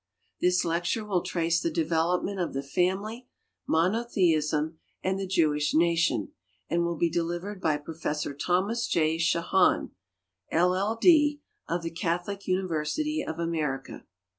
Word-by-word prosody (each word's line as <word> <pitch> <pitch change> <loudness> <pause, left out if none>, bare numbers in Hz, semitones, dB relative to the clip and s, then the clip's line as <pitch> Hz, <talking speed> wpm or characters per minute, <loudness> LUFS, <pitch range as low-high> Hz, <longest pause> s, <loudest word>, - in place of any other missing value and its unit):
This 180 0 +2
lecture 175 +6 -1
will 190 -4 0
trace 170 -1 0
the - - 0
development 165 +4 0
of 175 - -2
the 135 - -2
family, 190 - -1 0.4
monotheism, 160 -5 +1 0.2
and 190 +1 0
the 195 - -3
Jewish 155 -5 +1
nation, 165 -7 +2 0.4
and 170 0 +1
will 170 -1 -1
be 170 - +2
delivered 175 +4 -3
by 155 -4 +2
Prof. 150 -1 -4
Thomas 200 +6 +1
J. 160 -1 +1
Shahan, 170 +3 +2 0.6
LL. 185 +6 +2
D., 295 -1 +5 0.3
of 170 0 -1
the 165 - -3
Catholic 175 +4 -3
University 185 - -1
of 160 - -5
America. 155 -5 -3
170 Hz, 130 wpm, -27 LUFS, 160-190 Hz, 0.6 s, D